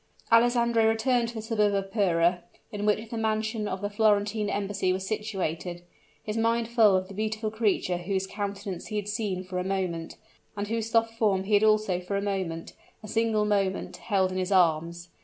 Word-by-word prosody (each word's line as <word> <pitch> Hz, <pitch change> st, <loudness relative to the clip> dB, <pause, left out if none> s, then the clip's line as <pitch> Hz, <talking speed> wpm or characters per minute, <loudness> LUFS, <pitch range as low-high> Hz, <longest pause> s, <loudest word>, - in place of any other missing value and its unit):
Alessandro 235 Hz, -1 st, +4 dB
returned 235 Hz, +2 st, +1 dB
to 235 Hz, -, -8 dB
the 220 Hz, -, -4 dB
suburb 210 Hz, -2 st, +1 dB
of 195 Hz, 0 st, -2 dB
Pera, 175 Hz, -4 st, +2 dB, 0.3 s
in 210 Hz, 0 st, -3 dB
which 215 Hz, +2 st, 0 dB
the 230 Hz, -, -3 dB
mansion 220 Hz, 0 st, -1 dB
of 190 Hz, -1 st, -4 dB
the 205 Hz, -, -2 dB
Florentine 210 Hz, 0 st, +2 dB
Embassy 200 Hz, -2 st, -1 dB
was 190 Hz, +1 st, -2 dB
situated 185 Hz, -5 st, -3 dB, 0.4 s
his 210 Hz, -, -4 dB
mind 230 Hz, 0 st, +1 dB
full 225 Hz, -4 st, +5 dB
of 185 Hz, 0 st, 0 dB
the 195 Hz, -, -10 dB
beautiful 215 Hz, +1 st, -2 dB
creature 210 Hz, -5 st, 0 dB
whose 190 Hz, +2 st, -2 dB
countenance 200 Hz, -2 st, -5 dB
he 215 Hz, -, -5 dB
had 205 Hz, -1 st, -2 dB
seen 205 Hz, -4 st, -2 dB
for 185 Hz, 0 st, -4 dB
a -, -, -1 dB
moment, 185 Hz, -4 st, -3 dB, 0.4 s
and 205 Hz, 0 st, -3 dB
whose 225 Hz, 0 st, -2 dB
soft 225 Hz, 0 st, +2 dB
form 205 Hz, -4 st, +1 dB
he 205 Hz, +2 st, -3 dB
had 205 Hz, +1 st, +5 dB
also 215 Hz, -4 st, +3 dB
for 185 Hz, +2 st, -3 dB
a -, -, +1 dB
moment 190 Hz, -5 st, -3 dB, 0.3 s
a -, -, -8 dB
single 220 Hz, -1 st, +1 dB
moment 200 Hz, -2 st, -1 dB
held 190 Hz, -3 st, 0 dB
in 185 Hz, -, -2 dB
his 185 Hz, +1 st, -2 dB
arms. 170 Hz, -1 st, +2 dB
205 Hz, 195 wpm, -27 LUFS, 185-220 Hz, 0.4 s, full